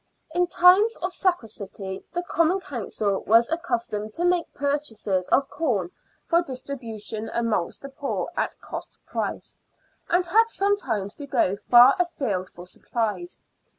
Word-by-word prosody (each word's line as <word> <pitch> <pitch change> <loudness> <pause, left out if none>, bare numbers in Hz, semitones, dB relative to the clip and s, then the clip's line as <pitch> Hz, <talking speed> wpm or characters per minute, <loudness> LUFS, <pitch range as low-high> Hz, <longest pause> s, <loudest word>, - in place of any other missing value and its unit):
In 355 +1 +2
times 370 +6 +5
of 365 +1 -4
scarcity 205 - -3
the 350 0 -2
Common 345 +2 +2
Council 215 - -2
was 230 +2 +6
accus 325 -8 -1
tomed 210 0 -5
to 345 - -1
make 355 -1 +1
purchases 225 -10 -1
of 275 - +3
corn 210 - -1 0.3
for 340 0 +3
distribution 230 -7 -5
amongst 230 -5 -1
the 275 - -6
poor 275 +1 -3
at - - -2
cost - - -8
price, - - -4 0.5
and 355 +1 +3
had 445 +6 +4
sometimes 390 - 0
to 285 - -9
go 195 -7 +2
far 245 - +7
afield 245 - -1
for 175 - -12
supplies. 230 - -4
270 Hz, 140 wpm, -25 LUFS, 215-350 Hz, 0.5 s, far